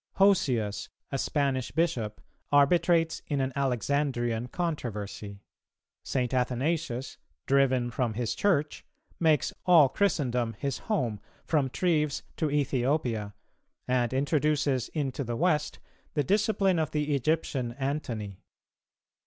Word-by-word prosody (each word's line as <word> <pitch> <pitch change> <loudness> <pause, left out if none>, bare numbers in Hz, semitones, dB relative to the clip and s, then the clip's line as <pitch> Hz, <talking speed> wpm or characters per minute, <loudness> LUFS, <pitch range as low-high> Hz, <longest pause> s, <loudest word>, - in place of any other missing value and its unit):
Hosius, 125 - +2 0.2
a 135 - -1
Spanish 135 -4 0
Bishop, 120 -10 -1 0.3
arbitrates 165 +3 +3
in 145 -2 -1
an 130 0 -1
Alexandrian 125 -3 0
controversy. 105 - -4 0.6
St. 125 -2 -1
Athanasius, 130 +2 -1 0.3
driven 130 -3 +2
from 120 -3 -1
his 120 -1 -1
Church, 155 -7 0 0.4
makes 155 -5 +2
all 165 -7 +6
Christendom 125 - 0
his 140 +2 -3
home, 125 - 0 0.3
from 145 -5 +1
Treves 150 -1 0
to 155 - 0
Ethiopia, 130 - 0 0.5
and 125 -2 +1
introduces 145 -1 +1
into 140 -2 -1
the 120 -1 -3
West 150 +1 +1 0.4
the 145 - +2
discipline 195 - +2
of 155 - 0
the 150 -1 -1
Egyptian 140 -4 0
Antony. 120 -8 -4
140 Hz, 110 wpm, -28 LUFS, 120-155 Hz, 0.6 s, all